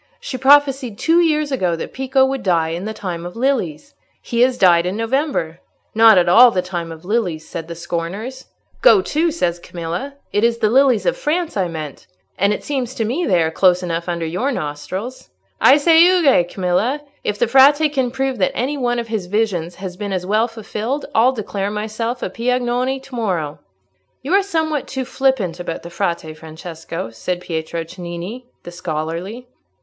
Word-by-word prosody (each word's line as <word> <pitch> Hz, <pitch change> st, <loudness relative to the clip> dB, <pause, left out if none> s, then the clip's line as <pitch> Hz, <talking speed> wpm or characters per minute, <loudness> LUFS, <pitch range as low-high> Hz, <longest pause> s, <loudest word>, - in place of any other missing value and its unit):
She 275 Hz, -, -6 dB
prophesied 270 Hz, -3 st, +3 dB
two 330 Hz, +6 st, +3 dB
years 305 Hz, -3 st, +1 dB
ago 185 Hz, -10 st, 0 dB
that 165 Hz, -, -7 dB
Pico 265 Hz, 0 st, +2 dB
would 265 Hz, -1 st, -2 dB
die 170 Hz, -4 st, +1 dB
in 170 Hz, +4 st, -4 dB
the 220 Hz, -, -3 dB
time 175 Hz, -5 st, -5 dB
of 175 Hz, 0 st, -8 dB
lilies. 250 Hz, -, -1 dB, 0.3 s
He 235 Hz, 0 st, -2 dB
has 250 Hz, 0 st, +3 dB
died 175 Hz, -3 st, +4 dB
in 190 Hz, +3 st, -3 dB
November. 225 Hz, -, -1 dB, 0.3 s
'Not 225 Hz, -2 st, +7 dB
at 175 Hz, -, +4 dB
all 240 Hz, +8 st, +8 dB
the 185 Hz, -5 st, -1 dB
time 175 Hz, -2 st, -5 dB
of 160 Hz, +1 st, -11 dB
lilies,' 180 Hz, -7 st, -1 dB
said 165 Hz, -1 st, -6 dB
the 170 Hz, -, -7 dB
scorners. 175 Hz, +10 st, -5 dB, 0.4 s
'Go 430 Hz, -6 st, +6 dB
to!' 325 Hz, +3 st, +1 dB
says 175 Hz, -, -1 dB
Camilla; 175 Hz, +11 st, -5 dB, 0.2 s
'it 205 Hz, -, +1 dB
is 235 Hz, 0 st, +3 dB
the 215 Hz, -2 st, +1 dB
lilies 260 Hz, -2 st, +4 dB
of -, -, +1 dB
France 345 Hz, -6 st, -1 dB
I 190 Hz, -3 st, 0 dB
meant, 155 Hz, -4 st, -7 dB, 0.3 s
and 200 Hz, +2 st, +2 dB
it 210 Hz, -, -3 dB
seems 260 Hz, -3 st, -3 dB
to 225 Hz, -, -1 dB
me 280 Hz, +11 st, -1 dB
they 180 Hz, -4 st, +3 dB
are 160 Hz, -, -1 dB
close 180 Hz, +1 st, +3 dB
enough 170 Hz, 0 st, -3 dB
under 170 Hz, -1 st, -2 dB
your 185 Hz, -, -1 dB
nostrils.' 185 Hz, -, -5 dB, 0.3 s
I 275 Hz, -, +7 dB
say, 325 Hz, +2 st, +5 dB
'Euge, 335 Hz, -, +4 dB
Camilla!' 195 Hz, +11 st, 0 dB, 0.2 s
If 205 Hz, -, -2 dB
the 240 Hz, -, +2 dB
Frate 285 Hz, +5 st, +5 dB
can 260 Hz, -3 st, +1 dB
prove 265 Hz, -1 st, -2 dB
that 185 Hz, -, +1 dB
any 275 Hz, +5 st, -1 dB
one 245 Hz, -1 st, 0 dB
of 235 Hz, -1 st, -4 dB
his 215 Hz, -5 st, -3 dB
visions 180 Hz, -5 st, -1 dB
has 185 Hz, -2 st, -7 dB
been 205 Hz, 0 st, -4 dB
as 180 Hz, -1 st, -2 dB
well 215 Hz, +4 st, +2 dB
fulfilled, 225 Hz, +4 st, -4 dB
I'll 235 Hz, +4 st, +4 dB
declare 200 Hz, -4 st, -3 dB
myself 220 Hz, +3 st, -3 dB
a -, -, -2 dB
Piagnone 250 Hz, +2 st, -1 dB
to 265 Hz, -1 st, -11 dB
morrow." 175 Hz, -10 st, -2 dB, 0.6 s
"You 290 Hz, +7 st, -2 dB
are 395 Hz, -, +5 dB
something 320 Hz, -7 st, -1 dB
too 265 Hz, -1 st, -4 dB
flippant 245 Hz, -10 st, 0 dB
about 170 Hz, -2 st, -5 dB
the 170 Hz, -, -9 dB
Frate, 170 Hz, -2 st, -3 dB
Francesco," 160 Hz, -4 st, -7 dB
said 175 Hz, +11 st, -3 dB
Pietro 165 Hz, -1 st, -4 dB
Cennini, 175 Hz, +7 st, -7 dB, 0.2 s
the 175 Hz, -, -9 dB
scholarly. 175 Hz, +7 st, -5 dB
215 Hz, 190 wpm, -19 LUFS, 175-265 Hz, 0.6 s, all